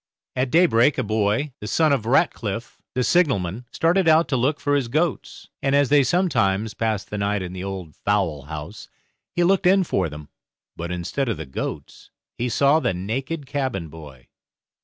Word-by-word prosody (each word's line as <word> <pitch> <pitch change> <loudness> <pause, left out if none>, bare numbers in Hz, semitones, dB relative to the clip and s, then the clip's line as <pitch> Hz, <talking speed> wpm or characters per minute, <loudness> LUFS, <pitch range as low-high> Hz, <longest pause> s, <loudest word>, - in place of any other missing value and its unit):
At 130 0 0
daybreak 145 -5 +4
a 130 - 0
boy, 110 +6 0
the 105 - -7
son 155 +5 +3
of 115 -5 -1
Ratcliff, 115 - 0 0.2
the 130 - +1
signal 165 - +3
man, 95 +7 -5
started 170 +2 +2
out 160 +1 +5
to 135 - +1
look 135 +4 +1
for 145 0 0
his 135 -4 0
goats, 155 +5 -2
and 135 0 +1
as 140 -2 +3
they 145 0 +6
sometimes 115 - +1
passed 110 -3 -2
the 105 - -3
night 100 -1 0
in 90 0 -6
the 95 0 -6
old 95 -5 -6
fowlhouse, 80 -3 -3 0.4
he 175 - +1
looked 190 +1 +3
in 190 +1 +5
for 95 - -1
them. 75 0 -10 0.5
But 85 +1 -5
instead 90 +10 -2
of 115 - -1
the - - -6
goats, 65 - -6 0.3
he 125 +1 -2
saw 140 +6 +3
the 95 - -1
naked 135 - -4
cabin 130 - -3
boy. 75 -5 -12
115 Hz, 180 wpm, -23 LUFS, 95-145 Hz, 0.5 s, they